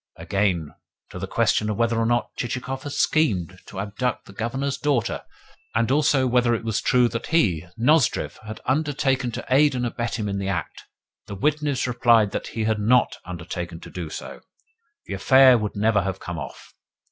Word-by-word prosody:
Again, 85 -2 -1 0.4
to - - -7
the - - -4
question 105 - +1
of 105 - -2
whether 115 -1 +1
or 115 - +1
not 120 0 0
Chichikov 130 +2 -4
had 145 0 -6
schemed 95 - +1
to 95 - -8
abduct 105 +5 -2
the 100 - -13
Governor's 135 +6 -2
daughter, 140 -5 0 0.5
and 115 +2 +2
also 140 -2 +3
whether 125 -1 +3
it 115 - -5
was 110 -2 -1
true 125 -1 +3
that 115 - -5
he, 90 - +1
Nozdrev, 130 +2 +2
had 110 0 -9
undertaken 135 -2 0
to - - -5
aid 145 +1 +4
and 125 -1 -1
abet 120 0 -3
him 105 -2 -2
in 100 -1 -2
the 100 - -3
act, 90 -5 -4 0.4
the 100 - -6
witness 150 +4 0
replied 120 -4 +3
that, - - -4
had 110 -1 -1
he 105 - -4
not 125 +3 +3
undertaken 85 -1 -6
to - - -11
do 85 -4 -5
so, - - -8 0.6
the - - -6
affair 130 +6 +6
would 105 -3 -2
never 105 0 +2
have 95 0 -3
come 85 -2 -6
off. - - -9
115 Hz, 185 wpm, -24 LUFS, 100-130 Hz, 0.6 s, affair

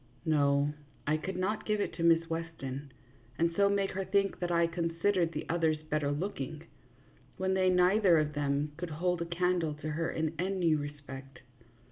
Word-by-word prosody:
No, 145 -2 +3 0.3
I 150 - +2
could 180 +4 -4
not 200 +4 -1
give 210 -1 +1
it - - -1
to 165 - -4
Miss 165 0 +4
Weston, 150 -5 -5 0.5
and 170 0 +2
so 200 +1 +4
make 200 -1 +1
her 195 +1 -2
think 195 +1 +1
that 175 - -1
I 170 0 +4
considered 170 +1 0
the - - -4
others 160 -2 +1
better 150 -2 +1
looking, 145 -3 -4 0.7
when 190 0 0
they 185 -1 +3
neither 180 0 +5
of 150 -1 +1
them 145 0 0
could 175 0 -4
hold 175 +3 -1
a - - 0
candle 170 -2 0
to 155 +1 -5
her 160 +2 -1
in 160 0 -1
any 180 -3 +2
respect. 145 -2 -6
165 Hz, 175 wpm, -31 LUFS, 150-185 Hz, 0.7 s, neither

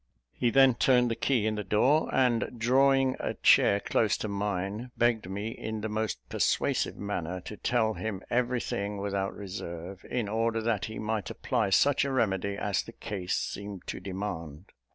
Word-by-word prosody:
He 120 - +1
then 135 +1 +6
turned 125 0 +3
the - - 0
key 120 -4 +1
in 110 - +1
the 105 -1 -3
door; 125 - +3
and, 125 -1 +1
drawing 135 +2 +3
a - - -3
chair 100 - +5
close 105 +1 +1
to - - -3
mine, 100 +3 -3
begged 115 -5 +1
me, 100 +3 -3
in 110 -1 -5
the 110 - -3
most 105 - -3
persuasive - - 0
manner, 90 -3 -3
to 105 - -8
tell 110 0 +1
him 105 -3 -4
every 125 0 +1
thing 100 +1 -3
without 100 -1 -2
reserve, 90 -2 -7
in 120 -4 -1
order 115 +2 0
that 110 -3 0
he 110 -1 -7
might 110 -2 -2
apply - - -1
such 140 +7 +4
a 140 - -1
remedy 100 -5 0
as 100 -2 0
the 115 - -11
case 95 -6 -3
seemed 100 -2 -5
to - - -5
demand. 95 -4 -6
105 Hz, 175 wpm, -29 LUFS, 100-120 Hz, -, then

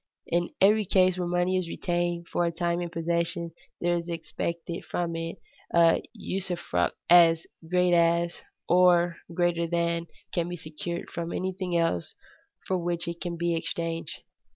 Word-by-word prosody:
In 175 0 0
every 210 +2 +5
case 185 -1 +4
where 180 -1 -2
money 175 +1 +1
is 180 -2 -2
retained 175 -1 -1
for 175 - 0
a 170 - +1
time 170 +1 -1
in 175 - -3
possession, 170 0 -1 0.3
there 175 0 +1
is 170 0 -3
expected 170 +1 -4
from 170 -1 -2
it 165 0 -4 0.4
a 170 -1 +5
usufruct 175 - -2
as 165 -1 +6 0.2
great 180 0 +3
as, 170 0 +2 0.3
or 175 -1 +4
greater 170 -1 +1
than, 170 0 0 0.3
can 170 0 0
be 175 - -4
secured 160 +2 -6
from 170 0 -4
anything 185 -1 -2
else 165 - 0 0.5
for 185 -1 0
which 175 0 -2
it 170 0 -5
can 175 -1 -3
be 170 0 0
exchanged. 165 0 -4
170 Hz, 155 wpm, -27 LUFS, 170-175 Hz, 0.5 s, as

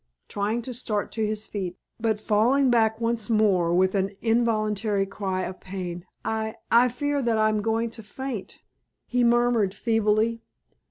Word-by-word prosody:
trying 210 +4 -2
to 255 - -6
start 220 -4 -2
to 220 - -2
his 215 0 -2
feet, 185 -3 -5 0.2
but 220 -2 0
falling 240 +6 +3
back 220 -2 +3
once 230 -2 0
more 200 -6 +3
with 185 +2 +3
an 195 -1 +1
involuntary 215 -3 +1
cry 190 -1 -3
of 185 0 -6
pain. 180 -2 -6 0.2
"I 220 0 -2 0.2
I 240 +2 +6
fear 285 +4 -1
that 235 -3 +1
I 215 0 +3
am 215 -1 0
going 225 +1 0
to 230 - -8
faint!" 230 0 -6 0.4
he 250 0 +1
murmured, 235 -4 +3
feebly. 225 +1 +1
220 Hz, 160 wpm, -25 LUFS, 205-235 Hz, 0.4 s, I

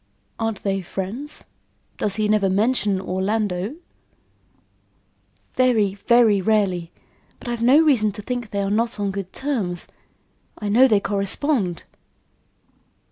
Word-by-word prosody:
"Aren't 225 -3 -3
they 195 -1 -1
friends? 200 - -6 0.6
Does 205 - 0
he 215 -1 0
never 210 -2 +2
mention 205 0 +1
Orlando?" 190 +3 -2 1.8
"Very, 230 -6 +2
very 215 0 +3
rarely. 185 -5 0 0.5
But - - -12
I've 240 -1 -3
no 250 +5 +5
reason 265 -10 +3
to 210 0 -9
think 245 -2 -4
they 200 0 -2
are 195 - -2
not 230 +1 0
on 200 -1 -1
good 195 -1 -6
terms. 220 -11 -3 0.7
I 210 - -4
know 245 +6 +6
they 215 -5 +3
correspond." 200 - -1
210 Hz, 125 wpm, -22 LUFS, 195-235 Hz, 1.8 s, know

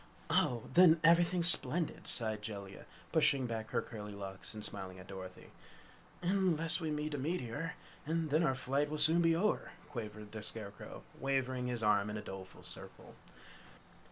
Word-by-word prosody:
"Oh! 120 -3 +2
Then 170 -2 +7
everything's 170 +1 +6
splendid!" 175 -1 +4
sighed 110 -3 +2
Jellia, 100 -2 -8 0.2
pushing 135 -2 +3
back 110 -2 -4
her - - -1
curly 105 -2 -8
locks 95 +1 -8
and 105 -1 -6
smiling 95 -1 -7
at 95 - -11
Dorothy. 95 -1 -10 0.7
"Unless 175 -2 +1
we 160 - -2
meet 150 0 -3
a 145 - -3
meteor, 160 +2 -3 0.3
and 160 -1 -1
then 155 +3 +3
our 150 -6 +2
flight 140 +3 -1
will 155 - -3
soon 160 +3 +6
be 165 -1 +3
o'er," 210 +6 -1 0.2
quavered 105 -5 -7
the 110 - -7
Scarecrow, 105 -1 -7 0.2
waving 130 -2 -1
his 120 -2 -3
arm 105 -1 +2
in 105 - -4
a - - -5
doleful 95 -2 -10
circle. - - -11
130 Hz, 160 wpm, -34 LUFS, 105-165 Hz, 0.7 s, Then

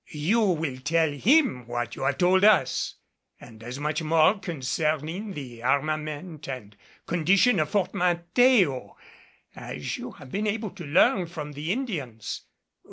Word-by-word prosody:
You 165 +10 +1
will 160 -10 0
tell 160 +3 +1
him 145 - +2
what 120 -1 -3
you - - -9
have - - +1
told 185 +1 +3
us, 200 -12 +3 0.4
and 110 -2 -14
as 120 +3 -7
much 150 +2 -1
more 160 +5 +3
concerning 160 +5 -2
the 125 -7 -8
armament 155 +4 -2
and 110 -6 -7 0.3
condition 190 +6 +3
of 155 -1 0
Fort 190 -3 0
Mateo 180 - +2 0.6
as - - -5
you - - -7
have 130 - -13
been 210 +2 -1
able 215 -1 -2
to 175 -3 -9
learn 185 - +3
from 150 -3 -7
the 150 +4 -4
Indians. 155 - -4
160 Hz, 145 wpm, -26 LUFS, 140-190 Hz, 0.6 s, told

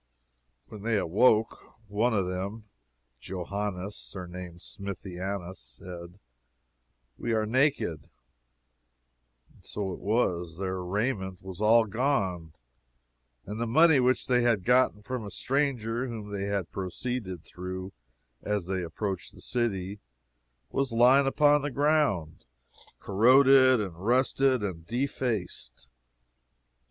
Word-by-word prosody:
When 105 - -10
they 110 0 +1
awoke, 110 +5 +2
one 105 +5 +1
of 95 -3 +1
them, 95 +5 -4 0.6
Johannes 95 +3 -4
surnamed 90 -2 -8
Smithianus 95 -1 -6
said, 85 +9 -10 1.0
We 120 - -1
are 110 -1 +1
naked. 130 - 0 1.4
And - - -23
it - - -10
was 95 -3 -1
so. 100 - -5
Their 95 -1 -2
raiment 95 -1 -2
was 95 0 -8
all 115 +2 +5
gone, 100 - -1 0.9
and 105 +3 -5
the 120 - 0
money 155 +4 +6
which 130 0 +2
they 125 -1 +3
had 115 -6 +2
gotten 125 -4 +3
from 125 0 -4
a 105 - -6
stranger 125 -2 -1
whom 110 -4 -7
they 100 -1 -3
had 100 -3 -2
proceeded 95 -1 -4
through 95 +1 -7 0.5
as 105 -3 -2
they 95 0 -2
approached 95 +3 -4
the - - -14
city, 100 -5 -2 0.7
was 135 -2 0
lying 125 +4 +5
upon 145 +1 +4
the 145 - -2
ground, 140 - +1 0.6
corroded 130 +4 +6
and 95 -5 -4
rusted 130 +1 +2
and 85 -5 -5
defaced. 115 - -3
105 Hz, 115 wpm, -28 LUFS, 95-125 Hz, 1.4 s, money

